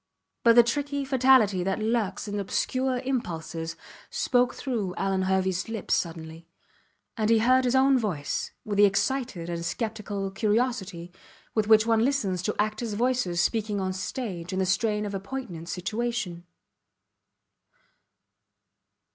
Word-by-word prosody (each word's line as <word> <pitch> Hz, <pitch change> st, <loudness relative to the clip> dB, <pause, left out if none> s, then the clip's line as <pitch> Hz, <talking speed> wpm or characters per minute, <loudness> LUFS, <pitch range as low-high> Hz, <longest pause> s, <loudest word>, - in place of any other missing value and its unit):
But 230 Hz, -1 st, +6 dB
the 240 Hz, -, +9 dB
tricky 285 Hz, +3 st, -2 dB
fatality 255 Hz, -8 st, +4 dB
that 190 Hz, +1 st, 0 dB
lurks 220 Hz, -3 st, -1 dB
in 205 Hz, 0 st, -3 dB
obscure 255 Hz, +6 st, -1 dB
impulses 165 Hz, -10 st, -3 dB, 0.3 s
spoke 245 Hz, -1 st, +1 dB
through 220 Hz, -9 st, -3 dB
Alvan 195 Hz, -1 st, 0 dB
Herveys 190 Hz, 0 st, 0 dB
lips 225 Hz, -3 st, -2 dB
suddenly; 165 Hz, -1 st, -3 dB, 0.7 s
and 215 Hz, -1 st, +1 dB
he 230 Hz, -, +5 dB
heard 255 Hz, +3 st, +4 dB
his 250 Hz, +1 st, +2 dB
own 265 Hz, 0 st, +5 dB
voice 175 Hz, -11 st, -2 dB, 0.2 s
with 205 Hz, -2 st, -2 dB
the 205 Hz, -, +8 dB
excited 205 Hz, -3 st, 0 dB
and 170 Hz, -1 st, -4 dB
sceptical 205 Hz, -1 st, -3 dB
curiosity 205 Hz, -4 st, -1 dB, 0.4 s
with 215 Hz, -2 st, +1 dB
which 220 Hz, 0 st, +6 dB
one 225 Hz, -1 st, +3 dB
listens 220 Hz, -10 st, 0 dB
to 210 Hz, +3 st, -2 dB
actors 215 Hz, +1 st, -1 dB
voices 235 Hz, -7 st, +1 dB
speaking 210 Hz, +1 st, 0 dB
on 190 Hz, -1 st, -1 dB
the 185 Hz, -, -5 dB
stage 190 Hz, -4 st, -4 dB
in 190 Hz, -, -3 dB
the 190 Hz, -, +1 dB
strain 210 Hz, +2 st, +1 dB
of 205 Hz, -, -4 dB
a 195 Hz, -, -2 dB
poignant 195 Hz, -6 st, -6 dB
situation. 195 Hz, -2 st, -3 dB
210 Hz, 140 wpm, -27 LUFS, 185-240 Hz, 0.7 s, the